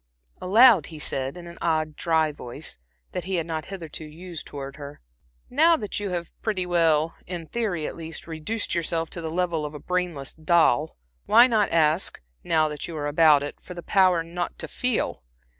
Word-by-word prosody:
Aloud 215 Hz, -, +6 dB
he 160 Hz, -, -10 dB
said, 135 Hz, 0 st, -3 dB
in 175 Hz, -, -9 dB
an 170 Hz, 0 st, -11 dB
odd, 155 Hz, -2 st, 0 dB
dry 160 Hz, -2 st, +1 dB
voice 120 Hz, -, -8 dB, 0.3 s
that -, -, -4 dB
he 190 Hz, 0 st, -2 dB
had 165 Hz, -2 st, 0 dB
not 160 Hz, -2 st, -4 dB
hitherto 165 Hz, -5 st, -7 dB
used 165 Hz, +2 st, -8 dB
towards 140 Hz, -1 st, -7 dB
her, 145 Hz, -1 st, -9 dB, 0.5 s
"Now 320 Hz, +5 st, +4 dB
that 210 Hz, -7 st, -4 dB
you 205 Hz, -1 st, -3 dB
have 175 Hz, -2 st, -4 dB
pretty 195 Hz, -5 st, -1 dB
well 165 Hz, -3 st, +2 dB
in 175 Hz, -2 st, -5 dB
theory 190 Hz, -6 st, -2 dB
at -, -, -5 dB
least, 165 Hz, -1 st, -6 dB
reduced 165 Hz, +7 st, -3 dB
yourself 165 Hz, -1 st, -1 dB
to 170 Hz, -, -5 dB
the 160 Hz, -, -4 dB
level 170 Hz, -2 st, -1 dB
of 150 Hz, 0 st, -5 dB
a -, -, -6 dB
brainless 175 Hz, -5 st, -2 dB
doll, 160 Hz, -2 st, +2 dB, 0.3 s
why 235 Hz, -, +8 dB
not 220 Hz, -5 st, +2 dB
ask, 160 Hz, +2 st, +2 dB, 0.2 s
now 155 Hz, -1 st, +2 dB
that 150 Hz, -1 st, -5 dB
you 165 Hz, -, -6 dB
are 145 Hz, -, -3 dB
about 150 Hz, -1 st, +5 dB
it, 145 Hz, -, -7 dB
for 180 Hz, -, -10 dB
the 175 Hz, -, -7 dB
power 185 Hz, -4 st, +3 dB
not 175 Hz, +1 st, -4 dB
to 160 Hz, -, -6 dB
feel? 250 Hz, -, -1 dB
165 Hz, 190 wpm, -25 LUFS, 155-180 Hz, 0.5 s, why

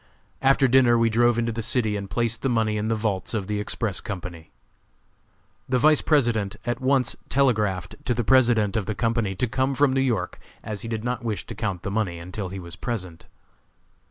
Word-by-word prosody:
After 135 Hz, 0 st, +4 dB
dinner 125 Hz, -2 st, +5 dB
we 115 Hz, -1 st, +2 dB
drove 120 Hz, +1 st, +3 dB
into 115 Hz, 0 st, 0 dB
the 115 Hz, +1 st, -4 dB
city 110 Hz, -2 st, +1 dB
and 100 Hz, -1 st, -5 dB
placed 115 Hz, 0 st, 0 dB
the 135 Hz, -, 0 dB
money 110 Hz, -3 st, +1 dB
in 105 Hz, +1 st, -1 dB
the 115 Hz, -, +1 dB
vaults 105 Hz, -1 st, -2 dB
of 105 Hz, -3 st, -2 dB
the 105 Hz, +1 st, -2 dB
Express 105 Hz, -1 st, -2 dB
Company. 90 Hz, -5 st, -7 dB, 1.2 s
The 130 Hz, -, +2 dB
Vice 150 Hz, +3 st, +4 dB
President 115 Hz, -9 st, +1 dB
at 120 Hz, 0 st, -2 dB
once 130 Hz, 0 st, +2 dB
telegraphed 105 Hz, -10 st, +1 dB
to 120 Hz, -, 0 dB
the 120 Hz, -, -1 dB
President 115 Hz, -2 st, +3 dB
of 105 Hz, -4 st, -1 dB
the 110 Hz, -, -2 dB
company 115 Hz, -3 st, 0 dB
to 110 Hz, -, 0 dB
come 130 Hz, +3 st, -1 dB
from 140 Hz, -1 st, +3 dB
New 135 Hz, -, +2 dB
York, 115 Hz, -9 st, -1 dB, 0.2 s
as 105 Hz, -2 st, -5 dB
he -, -, -5 dB
did 110 Hz, -1 st, -3 dB
not 125 Hz, +1 st, -2 dB
wish 110 Hz, -3 st, -3 dB
to -, -, -7 dB
count 100 Hz, -5 st, -3 dB
the 100 Hz, -, -3 dB
money 100 Hz, -5 st, -1 dB
until 90 Hz, +3 st, -6 dB
he 95 Hz, -, -6 dB
was 85 Hz, -2 st, -8 dB
present. 95 Hz, -9 st, -5 dB
115 Hz, 205 wpm, -24 LUFS, 100-120 Hz, 1.2 s, dinner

